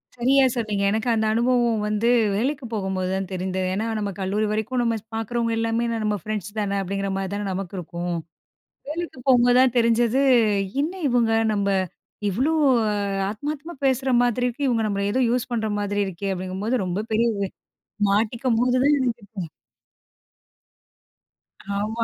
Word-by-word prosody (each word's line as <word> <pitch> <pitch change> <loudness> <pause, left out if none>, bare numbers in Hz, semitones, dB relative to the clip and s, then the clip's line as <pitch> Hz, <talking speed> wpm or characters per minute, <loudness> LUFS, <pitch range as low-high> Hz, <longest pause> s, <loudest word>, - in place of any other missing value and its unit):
சரியா 265 +3 +4
சொன்னீங்க. 215 -4 -1
எனக்கு 220 +3 -1
அந்த 220 -1 +1
அனுபவம் 235 -1 +2
வந்து 210 +2 +1 0.3
வேலைக்கு 265 +5 -1
போகும்போது 190 -3 -2
தான் 190 0 -2
தெரிந்தது. 185 0 -2
ஏன்னா, 215 +4 -1
நம்ம 205 -1 -2
கல்லூரி 200 +3 0
வரைக்கும் 220 +4 -1
நம்ம 230 -1 +1
ஸ் - - -39
பார்க்குறவங்க 230 +1 -1
எல்லாமே, 230 +1 0 0.2
நம்ம 210 -1 0
ஃப்ரெண்ட்ஸ் 210 -1 -5
தானே 200 -1 -1
அப்படிங்கிற 195 +1 -2
மாதிரி 195 0 -3
தானே 205 0 -3
நமக்கு 190 0 -4
இருக்கும். 175 0 -4 0.7
வேலைக்கு 330 -3 -5
போம்போதுதான் 250 0 +5
தெரிஞ்சது 235 +1 +3 0.6
"என்ன 310 +5 0
இவங்க 240 -3 +2 0.2
நம்ம 200 -1 0 0.6
இவ்ளோ 255 - +1 0.8
ஆத்மார்த்தமா 295 +9 -5
பேசுற 265 0 +1
மாதிரி 245 0 +1
இருக்கு, 250 +4 -2
இவங்க 230 -3 +1
நம்மள 200 -1 -1
ஏதோ 260 - +1
யூஸ் 250 +1 0
பண்ற 220 -2 0
மாதிரி 205 0 -1
இருக்கே!" 195 +1 -4
அப்படிங்கும்போது, 190 +6 -2
ரொம்ப 185 +4 -2
பெரிய 230 +2 +3
இது, 200 -1 -2 0.7
மாட்டிக்கும் 225 +4 +1
போது 250 0 +2
தான் 290 +1 +5
எனக்கு. 220 - -3 2.3
ஆமா. 215 +3 -1
220 Hz, 145 wpm, -23 LUFS, 200-245 Hz, 2.3 s, போம்போதுதான்